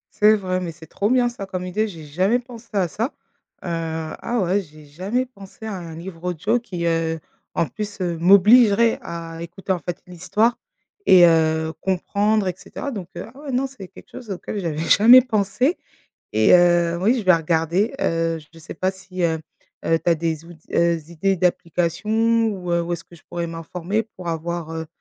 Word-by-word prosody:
C'est 215 Hz, 0 st, +6 dB
vrai, 185 Hz, -2 st, -2 dB
mais 175 Hz, -2 st, -4 dB
c'est 160 Hz, 0 st, -14 dB
trop 205 Hz, +6 st, -1 dB
bien 250 Hz, -1 st, +3 dB
ça 220 Hz, -5 st, -6 dB
comme 185 Hz, -1 st, -4 dB
idée, 215 Hz, +4 st, 0 dB
j'ai 165 Hz, -6 st, -9 dB
jamais 185 Hz, +11 st, +1 dB
pensé 240 Hz, -2 st, -11 dB
à 190 Hz, -3 st, +2 dB
ça. 220 Hz, +7 st, -2 dB, 0.6 s
Heu, -, -, -6 dB
ah 165 Hz, +7 st, -3 dB
ouais, 190 Hz, +3 st, +1 dB
j'ai 155 Hz, -3 st, -15 dB
jamais 190 Hz, -, -2 dB
pensé 210 Hz, -3 st, -13 dB
à 220 Hz, -, -4 dB
un 170 Hz, -3 st, -7 dB
livre 170 Hz, 0 st, -9 dB
audio 190 Hz, +7 st, 0 dB
qui 180 Hz, -7 st, -5 dB
heu, 165 Hz, -1 st, 0 dB, 0.4 s
en -, -, +2 dB
plus 205 Hz, +3 st, -6 dB
heu, 175 Hz, -2 st, -1 dB
m'obligerait 210 Hz, +5 st, +6 dB
à 165 Hz, -1 st, -7 dB
écouter, 175 Hz, +3 st, -5 dB
en 180 Hz, -, +1 dB
fait, 175 Hz, 0 st, -6 dB
l'histoire 190 Hz, +7 st, 0 dB, 0.5 s
et 180 Hz, -2 st, +9 dB
heu, 160 Hz, -1 st, +2 dB
comprendre 200 Hz, +2 st, +1 dB
et 180 Hz, -, 0 dB
cetera 280 Hz, -, -7 dB
donc 195 Hz, -8 st, -6 dB
heu, -, -, -5 dB
ah 265 Hz, -, -15 dB
ouais, 290 Hz, -2 st, -6 dB
non, 255 Hz, +2 st, +1 dB
c'est 255 Hz, -9 st, -9 dB
quelque -, -, -16 dB
chose 240 Hz, -4 st, -10 dB
auquel 200 Hz, +2 st, -4 dB
j'avais 165 Hz, -5 st, -3 dB
jamais 235 Hz, +9 st, +8 dB
pensé 225 Hz, -, 0 dB, 0.5 s
et 110 Hz, +7 st, +5 dB
heu, 175 Hz, -1 st, +4 dB
oui, 235 Hz, +6 st, +3 dB
je 225 Hz, -, -2 dB
vais 185 Hz, -1 st, +6 dB
regarder 165 Hz, +6 st, +1 dB
heu. 165 Hz, -, 0 dB
Je 165 Hz, -, -15 dB
sais 165 Hz, -, -9 dB
pas 185 Hz, -, 0 dB
si 185 Hz, -1 st, -7 dB
heu 160 Hz, -1 st, +1 dB, 0.5 s
heu, 165 Hz, 0 st, +3 dB
tu 175 Hz, -, 0 dB
as -, -, +5 dB
des 160 Hz, -1 st, -2 dB
out 175 Hz, -, -12 dB
s 160 Hz, -, -31 dB
heu, 170 Hz, 0 st, +3 dB
des 160 Hz, +1 st, -12 dB
idées 195 Hz, +4 st, +1 dB
d'applications 210 Hz, +7 st, +1 dB
ou 180 Hz, -4 st, -3 dB
heu 170 Hz, -, +3 dB
où 170 Hz, +1 st, -2 dB
est-ce -, -, -9 dB
que -, -, -17 dB
je 170 Hz, -, -17 dB
pourrais 170 Hz, -1 st, -3 dB
m'informer 170 Hz, +5 st, -3 dB
pour 180 Hz, -2 st, -7 dB
avoir, 165 Hz, 0 st, -3 dB
heu 160 Hz, 0 st, -4 dB
180 Hz, 205 wpm, -22 LUFS, 165-210 Hz, 0.6 s, et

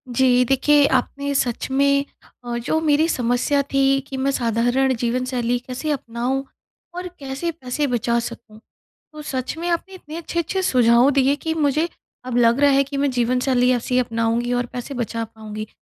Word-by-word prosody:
जी 250 Hz, 0 st, +4 dB
देखिए, 285 Hz, +3 st, +4 dB
आपने 280 Hz, 0 st, -1 dB
सच 245 Hz, -2 st, -1 dB
में 280 Hz, +1 st, +3 dB, 0.4 s
अ, 240 Hz, 0 st, -3 dB
जो 250 Hz, +7 st, 0 dB
मेरी 310 Hz, 0 st, +3 dB
समस्या 245 Hz, +2 st, +1 dB
थी 275 Hz, 0 st, +3 dB
कि 270 Hz, -, -6 dB
मैं 270 Hz, +1 st, +1 dB
साधारण 245 Hz, +2 st, +1 dB
जीवन 245 Hz, +2 st, -1 dB
शैली 245 Hz, -1 st, -1 dB
कैसे 255 Hz, +5 st, -4 dB
अपनाऊँ 255 Hz, 0 st, -2 dB, 0.5 s
और 360 Hz, 0 st, -4 dB
कैसे 275 Hz, +5 st, -3 dB
पैसे 290 Hz, -1 st, -3 dB
बचा 235 Hz, -1 st, 0 dB
सकूँ। 225 Hz, -2 st, -8 dB, 0.5 s
तो 305 Hz, -, -8 dB
सच 260 Hz, 0 st, -4 dB
में 340 Hz, +1 st, -4 dB
आपने 350 Hz, +3 st, -2 dB
इतने 315 Hz, -3 st, -9 dB
अच्छे-अच्छे 340 Hz, +2 st, -2 dB
सुझाव 245 Hz, -4 st, +4 dB
दिए 275 Hz, 0 st, +3 dB
कि 320 Hz, +2 st, -3 dB
मुझे 305 Hz, +1 st, +1 dB, 0.4 s
अब 250 Hz, -1 st, -2 dB
लग 235 Hz, +1 st, +4 dB
रहा 285 Hz, 0 st, +5 dB
है 275 Hz, 0 st, +4 dB
कि 280 Hz, +1 st, -6 dB
मैं 280 Hz, 0 st, +1 dB
जीवन 250 Hz, 0 st, +1 dB
शैली 250 Hz, -1 st, +2 dB
ऐसी 250 Hz, +1 st, 0 dB
अपनाऊँगी 230 Hz, 0 st, 0 dB
और 245 Hz, 0 st, 0 dB
पैसे 250 Hz, +3 st, -5 dB
बचा 230 Hz, -2 st, -3 dB
पाऊँगी। 215 Hz, -1 st, -8 dB
260 Hz, 175 wpm, -21 LUFS, 240-285 Hz, 0.5 s, रहा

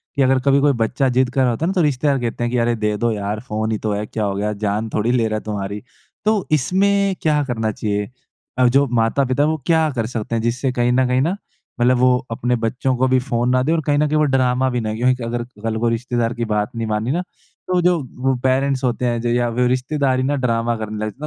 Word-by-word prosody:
कि 140 Hz, -, +1 dB
अगर 130 Hz, 0 st, +3 dB
कभी 140 Hz, 0 st, +4 dB
कोई 145 Hz, +1 st, +4 dB
बच्चा 125 Hz, +3 st, 0 dB
ज़िद 130 Hz, 0 st, +2 dB
कर 135 Hz, -, +2 dB
रहा 130 Hz, -, +3 dB
होता 120 Hz, +8 st, -2 dB
है -, -, 0 dB
ना -, -, -1 dB
तो 185 Hz, -, +2 dB
रिश्तेदार 140 Hz, -2 st, +1 dB
कहते 120 Hz, 0 st, -3 dB
हैं 120 Hz, -, -1 dB
कि, 125 Hz, -, 0 dB
"अरे 120 Hz, 0 st, +1 dB
दे 105 Hz, -1 st, -1 dB
दो 120 Hz, +2 st, 0 dB
यार, 105 Hz, 0 st, -3 dB
फ़ोन 110 Hz, -2 st, -3 dB
ही 110 Hz, -, 0 dB
तो 105 Hz, 0 st, -3 dB
है। 105 Hz, +1 st, -2 dB
क्या 110 Hz, 0 st, -4 dB
हो 100 Hz, -1 st, -2 dB
गया? 105 Hz, +2 st, -1 dB
जान 105 Hz, +1 st, -2 dB
थोड़ी 110 Hz, +3 st, +1 dB
ले 120 Hz, -3 st, +2 dB
रहा 110 Hz, 0 st, -1 dB
है -, -, -7 dB
तुम्हारी।" 105 Hz, -1 st, -4 dB, 0.4 s
तो 215 Hz, -3 st, +1 dB
इसमें 195 Hz, +6 st, +2 dB
क्या 150 Hz, -2 st, +2 dB
करना 110 Hz, -3 st, -1 dB
चाहिए? 105 Hz, -1 st, -2 dB, 0.5 s
और 125 Hz, -1 st, +5 dB
जो 140 Hz, +3 st, +4 dB, 0.2 s
माता-पिता 130 Hz, +4 st, +1 dB
हैं, 150 Hz, -, +2 dB
वो 160 Hz, -, 0 dB
क्या 160 Hz, -2 st, +3 dB
कर 115 Hz, -2 st, -1 dB
सकते 115 Hz, -1 st, -4 dB
हैं? 115 Hz, -, 0 dB
जिससे 125 Hz, +3 st, -1 dB
कहीं 120 Hz, -1 st, +1 dB
न 130 Hz, +1 st, +3 dB
कहीं 125 Hz, +1 st, +2 dB
ना 170 Hz, +7 st, 0 dB, 0.4 s
मतलब 125 Hz, +1 st, +3 dB
वो 125 Hz, 0 st, +4 dB
अपने 125 Hz, +2 st, 0 dB
बच्चों 125 Hz, +3 st, -1 dB
को 130 Hz, +1 st, +2 dB
भी 130 Hz, 0 st, +3 dB
फ़ोन 125 Hz, -1 st, -1 dB
ना 130 Hz, 0 st, +3 dB
दें 150 Hz, -, 0 dB
और 165 Hz, -, +1 dB
कहीं 145 Hz, -1 st, +2 dB
न 150 Hz, +1 st, +2 dB
कहीं 155 Hz, +1 st, 0 dB
वो 155 Hz, -, +3 dB
ड्रामा 130 Hz, 0 st, +2 dB
भी 125 Hz, -1 st, -1 dB
नहीं 110 Hz, -1 st, -3 dB
क्योंकि 125 Hz, +1 st, +1 dB
अगर 120 Hz, +1 st, -2 dB, 0.2 s
कल 110 Hz, -1 st, -1 dB
को 120 Hz, +1 st, +1 dB
रिश्तेदार 120 Hz, 0 st, -1 dB
की 120 Hz, 0 st, -3 dB
बात 105 Hz, -1 st, -1 dB
नहीं 115 Hz, -1 st, -3 dB
मानी 110 Hz, +3 st, -1 dB
ना, 170 Hz, +5 st, 0 dB, 0.5 s
तो 180 Hz, -1 st, +1 dB
जो 175 Hz, 0 st, +3 dB, 0.3 s
वो 135 Hz, 0 st, +2 dB
पेरेंट्स 135 Hz, +1 st, +1 dB
होते 125 Hz, 0 st, 0 dB
हैं 120 Hz, -1 st, 0 dB
जो 120 Hz, -, -1 dB
या 120 Hz, 0 st, +1 dB
फिर 125 Hz, 0 st, +2 dB
रिश्तेदार 130 Hz, +1 st, 0 dB
ही -, -, 0 dB
ना 145 Hz, +2 st, +1 dB
ड्रामा 115 Hz, 0 st, 0 dB
करने 110 Hz, -1 st, -5 dB
लगते 110 Hz, -, -5 dB
हैं -, -, -30 dB
125 Hz, 270 wpm, -20 LUFS, 115-135 Hz, 0.5 s, और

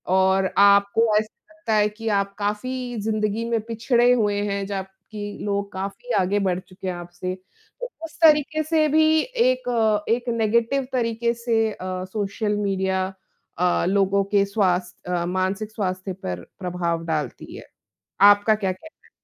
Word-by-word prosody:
और 190 Hz, 0 st, +3 dB
आपको 200 Hz, +2 st, +5 dB
ऐसा 215 Hz, +9 st, -5 dB
लगता 315 Hz, -9 st, -3 dB
है 210 Hz, 0 st, +3 dB
कि 225 Hz, +2 st, -8 dB
आप 200 Hz, 0 st, -6 dB
काफ़ी 245 Hz, +5 st, -3 dB
ज़िंदगी 215 Hz, +1 st, -1 dB
में 230 Hz, -1 st, +1 dB
पिछड़े 235 Hz, +2 st, +2 dB
हुए 205 Hz, -4 st, +1 dB
हैं, 200 Hz, 0 st, -2 dB
जबकि 200 Hz, +1 st, -7 dB
लोग 200 Hz, 0 st, -2 dB
काफ़ी 195 Hz, -, -5 dB
आगे 195 Hz, +3 st, +1 dB
बढ़ 185 Hz, -2 st, 0 dB
चुके 185 Hz, +1 st, -10 dB
हैं 185 Hz, -, -1 dB
आपसे। 175 Hz, +1 st, -6 dB, 0.5 s
तो -, -, -4 dB, 0.2 s
उस 320 Hz, -, -12 dB
तऱीके 310 Hz, 0 st, +5 dB
से 310 Hz, 0 st, +2 dB
भी 315 Hz, +1 st, +4 dB
एक 245 Hz, -, +1 dB
एक 240 Hz, +2 st, 0 dB
नेगेटिव 235 Hz, +4 st, +1 dB
तऱीके 235 Hz, -1 st, 0 dB
से 230 Hz, -2 st, 0 dB
अ, 185 Hz, -2 st, -5 dB
सोशल 210 Hz, 0 st, -1 dB
मीडिया 190 Hz, -2 st, 0 dB, 0.5 s
अ, 180 Hz, +1 st, +2 dB
लोगों 195 Hz, 0 st, +2 dB
के 200 Hz, -1 st, +5 dB
स्वास्थ 185 Hz, -4 st, -1 dB
अ, 175 Hz, -1 st, 0 dB
मानसिक 185 Hz, +4 st, -2 dB
स्वास्थ्य 185 Hz, -2 st, -3 dB
पर 90 Hz, -, -6 dB, 0.2 s
प्रभाव 175 Hz, -2 st, -2 dB
डालती 155 Hz, -6 st, -4 dB
है। -, -, -10 dB, 0.6 s
आपका 205 Hz, +2 st, +6 dB
क्या 195 Hz, -3 st, -1 dB
कहना 320 Hz, -, -17 dB
है? -, -, -28 dB
205 Hz, 155 wpm, -23 LUFS, 190-230 Hz, 0.6 s, आपका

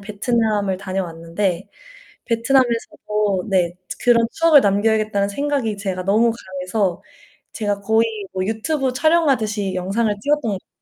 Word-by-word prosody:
베트남을 210 Hz, -1 st, 0 dB
다녀왔는데 185 Hz, 0 st, -3 dB, 0.6 s
베트남에서도 230 Hz, -5 st, 0 dB
네, 175 Hz, -3 st, +1 dB, 0.3 s
그런 235 Hz, -1 st, +5 dB
추억을 330 Hz, -3 st, +5 dB
남겨야겠다는 205 Hz, -1 st, +1 dB
생각이 270 Hz, -1 st, -1 dB
제가 190 Hz, -2 st, -4 dB
너무 220 Hz, +4 st, +3 dB
강해서 190 Hz, -2 st, -3 dB, 0.5 s
제가 205 Hz, -2 st, -2 dB
거의 220 Hz, +3 st, +2 dB, 0.3 s
뭐 185 Hz, 0 st, -2 dB
유튜브 255 Hz, +5 st, -1 dB
촬영하듯이 255 Hz, -, +1 dB
영상을 205 Hz, +4 st, 0 dB
찍었던 295 Hz, +3 st, +2 dB
것 -, -, 0 dB
같아요. -, -, -29 dB
210 Hz, 335 characters per minute, -20 LUFS, 195-235 Hz, 0.6 s, 그런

